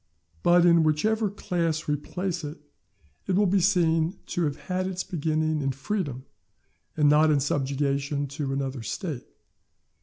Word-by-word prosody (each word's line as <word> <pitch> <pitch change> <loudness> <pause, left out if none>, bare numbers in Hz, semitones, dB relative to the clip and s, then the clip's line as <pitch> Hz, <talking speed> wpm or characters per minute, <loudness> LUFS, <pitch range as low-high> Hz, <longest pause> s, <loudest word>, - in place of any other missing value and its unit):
But 175 - +5
in 170 -1 +6
whichever 210 +8 +1
class 170 -5 -2
we 150 - +1
place 180 +4 -4
it, 150 +1 -6 0.7
it 190 - +1
will 205 +2 +4
be 195 +1 +3
seen 170 -2 +2
to 175 - -1
have 145 -2 -1
had 185 0 -2
its 185 -1 -3
beginning 155 -3 -1
in 135 -1 0
freedom, 140 - -3 0.7
and 150 -1 +4
not 150 +2 +5
in 150 -2 +3
subjection 140 +1 -1
to 140 -1 -3
another 135 -2 -3
State. 125 - -5
155 Hz, 150 wpm, -26 LUFS, 140-180 Hz, 0.7 s, in